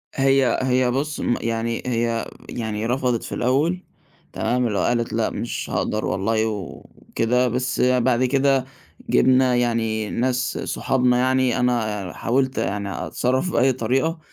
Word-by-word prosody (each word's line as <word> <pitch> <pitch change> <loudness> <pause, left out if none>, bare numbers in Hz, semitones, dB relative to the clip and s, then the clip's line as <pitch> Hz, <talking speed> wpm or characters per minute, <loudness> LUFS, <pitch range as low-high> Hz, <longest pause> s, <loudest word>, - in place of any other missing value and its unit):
هي 135 -1 +3
هي 130 -1 +2
بُص 145 +4 -2
م 120 - +1
يعني 115 0 -2
هي 115 -2 -1 0.2
يعني 110 -2 -3
رفضِت 125 -1 0
في - - -5
الأول، 150 +9 +1 0.5
تمام، 120 +1 0
لو 105 - -1
قالِت 120 -1 0
لأ 110 0 +1
مش 120 - -4
هاقدَر 110 0 -1
والله 110 +4 0
وكده 115 +4 -2
بس 125 +2 -1
بعد 125 0 +3
كده 135 0 +2 0.4
جِبنا 130 -1 +4
يعني 115 -3 0
ناس 125 +1 -1
صُحابنا 125 -2 +1
يعني، 130 0 +2
أنا 110 -6 -1
حاولت 130 +2 0
يعني 100 -1 -3
أتصرف 130 +8 0
بأي 130 0 +3
طريقة 130 +8 0
125 Hz, 135 wpm, -22 LUFS, 115-130 Hz, 0.5 s, جِبنا